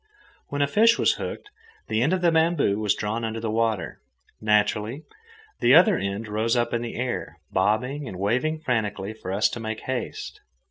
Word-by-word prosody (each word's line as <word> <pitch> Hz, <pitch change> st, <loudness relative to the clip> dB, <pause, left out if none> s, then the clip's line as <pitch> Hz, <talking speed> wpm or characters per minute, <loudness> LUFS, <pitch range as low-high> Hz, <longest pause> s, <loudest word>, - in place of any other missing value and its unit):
When 145 Hz, 0 st, 0 dB
a -, -, +2 dB
fish 225 Hz, +9 st, +4 dB
was -, -, +3 dB
hooked, 415 Hz, -, -6 dB, 0.4 s
the 110 Hz, +1 st, 0 dB
end 145 Hz, +7 st, +2 dB
of 185 Hz, -1 st, +1 dB
the 170 Hz, -1 st, +4 dB
bamboo 160 Hz, -10 st, +2 dB
was 105 Hz, -2 st, +1 dB
drawn 110 Hz, +3 st, -3 dB
under 115 Hz, 0 st, -3 dB
the 110 Hz, -1 st, -3 dB
water. 110 Hz, -, -1 dB, 0.4 s
Naturally, 105 Hz, +5 st, +1 dB, 0.6 s
the -, -, +5 dB
other 210 Hz, -4 st, +7 dB
end 100 Hz, -2 st, -3 dB
rose 110 Hz, +3 st, 0 dB
up 120 Hz, -, 0 dB
in 120 Hz, -, 0 dB
the 120 Hz, -1 st, -5 dB
air, 125 Hz, 0 st, -3 dB
bobbing 125 Hz, +9 st, 0 dB
and 95 Hz, -, -7 dB
waving 125 Hz, +11 st, 0 dB
frantically 110 Hz, -6 st, -2 dB
for 100 Hz, -4 st, -7 dB
us 100 Hz, +3 st, +3 dB
to -, -, -6 dB
make 110 Hz, -1 st, -4 dB
haste. 130 Hz, -2 st, -5 dB
115 Hz, 185 wpm, -25 LUFS, 105-140 Hz, 0.6 s, other